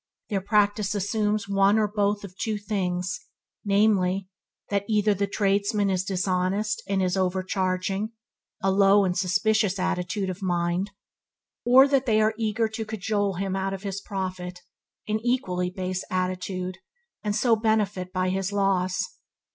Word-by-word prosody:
Their 195 -2 0
practice 205 0 +2
assumes 210 +1 0
one 200 +1 +4
or 215 -1 +3
both 205 0 0
of 185 -2 -9
two 215 +2 -2
things, 190 0 -2 0.4
namely, 195 -2 +2 0.4
that 200 -1 +1
either 210 -1 +3
the 200 +1 -1
tradesman 200 0 +1
is 185 -1 0
dishonest 190 +2 0
and 195 -1 +1
is 180 0 +1
overcharging 190 +2 -1 0.5
(a 195 - +3
low, 195 0 +5
suspicious 195 +2 +1
attitude 185 +1 -1
of 185 - -9
mind), 175 +1 0 0.7
or 260 +3 +7
that 275 -2 +1
they 215 -2 +4
are 215 0 +3
eager 220 0 0
to 220 +1 -4
cajole 205 -2 -1
him 190 +1 -2
out 195 0 -1
of 195 - -10
his 195 -1 -4
profit 185 -3 -5 0.5
(an 215 0 0
equally 185 -8 0
base 185 0 -3
attitude), 185 0 -2 0.4
and 210 -1 -1
so 235 0 +4
benefit 210 -4 0
by 185 0 0
his 190 +1 -1
loss. 195 -2 +1
195 Hz, 145 wpm, -26 LUFS, 185-210 Hz, 0.7 s, or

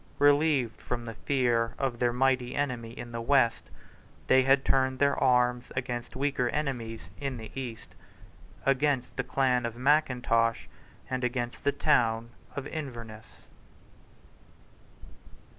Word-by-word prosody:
Relieved 145 -4 +3
from 120 -1 -4
the 115 - -6
fear 120 -2 0
of 130 -4 -2
their 120 -1 +2
mighty 125 0 +1
enemy 125 -5 -2
in 120 0 -7
the 115 0 -4
West, 130 -2 +2 0.6
they 130 - +5
had 135 +1 +3
turned 130 -1 +2
their 140 +1 +3
arms 125 -1 +2
against 120 -2 -4
weaker 135 -2 0
enemies 120 -7 -3 0.2
in 135 -3 -3
the 110 -1 -9
East, 125 -4 -7 0.7
against 135 -1 +1
the 135 - -1
clan 125 -1 +1
of 115 0 -4
Mackintosh 125 -5 +2 0.4
and 130 -1 -3
against 120 -1 -2
the 140 - +3
town 115 -6 +1 0.2
of 140 - -4
Inverness. 115 -8 -8
125 Hz, 125 wpm, -29 LUFS, 120-135 Hz, 0.7 s, they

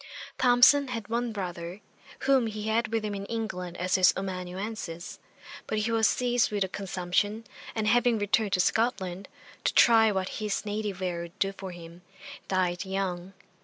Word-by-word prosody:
Thomson 255 +3 +6
had 230 -5 -5
one 235 +1 -1
brother, 180 -2 -5 0.4
whom 265 -3 +3
he 215 -1 -5
had 220 +1 +1
with 225 -1 -2
him 210 - -3
in 200 0 -5
England 180 -6 -4
as 180 +1 -2
his 185 -1 +5
amanuensis; 185 -1 -5 0.5
but 215 - -2
he 215 +2 0
was 225 -1 +4
seized 245 -1 +1
with 205 -2 0
a - - -2
consumption, 195 +3 -2 0.3
and 220 -1 -1
having 240 +1 +3
returned 205 0 +1
to 185 - +2
Scotland, 195 -3 0 0.4
to - - +2
try 225 -2 +6
what 190 -2 -1
his 210 0 -2
native 205 -3 -3
air 175 -2 -2
would 170 +3 -10
do 195 0 +1
for 195 -1 -8
him, 170 0 -11 0.5
died 180 -1 0
young. 190 -1 -3
205 Hz, 165 wpm, -28 LUFS, 185-225 Hz, 0.5 s, Thomson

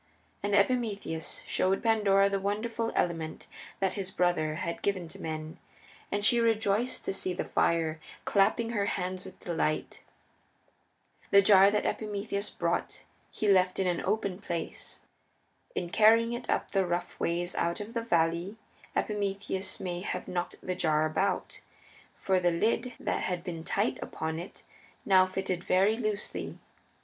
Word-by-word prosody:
And 205 0 +1
Epimetheus 200 - 0
showed 190 +1 +1
Pandora 205 -3 +4
the 200 0 0
wonderful 225 +3 -2
element 165 -2 -1 0.3
that 190 -1 +1
his 195 -2 -3
brother 175 -4 +1
had 170 0 -4
given 185 -4 -1
to 195 +4 -10
men, 155 0 -5 0.5
and 205 0 0
she 240 +1 +5
rejoiced 225 +1 +1
to - - -1
see 185 -1 -1
the - - -2
fire, 160 -2 +1 0.3
clapping 225 +3 +2
her 205 -3 0
hands 185 -1 -2
with 190 - -11
delight. 160 -3 -2 1.3
The 200 0 +7
jar 195 0 +7
that 210 0 0
Epimetheus 205 -1 -2
brought - - -2 0.2
he 215 - -2
left 185 -2 +4
in 190 - +1
an 175 -2 0
open 200 -3 -1
place. 170 -5 -5 0.7
In 175 -1 -3
carrying 225 +3 +5
it 240 - -6
up - - 0
the 195 -2 +2
rough 175 +1 -3
ways 175 +1 0
out 170 0 -1
of 210 +2 -7
the 230 - -1
valley 170 0 +1 0.4
Epimetheus 200 -2 -2
may 175 -1 -3
have 180 -1 -4
knocked 175 -1 -3
the 185 - -1
jar 155 -4 +2
about, 175 +6 -1 0.6
for 190 -1 +2
the 175 -1 +3
lid 220 +8 0
that - - -1
had 180 -2 -2
been 170 -3 -5
tight 200 +6 0
upon 160 +1 -4
it 175 - -10 0.4
now 185 -1 +6
fitted 185 -1 -2
very 195 +4 +3
loosely. 215 -3 -3
190 Hz, 150 wpm, -30 LUFS, 175-205 Hz, 1.3 s, The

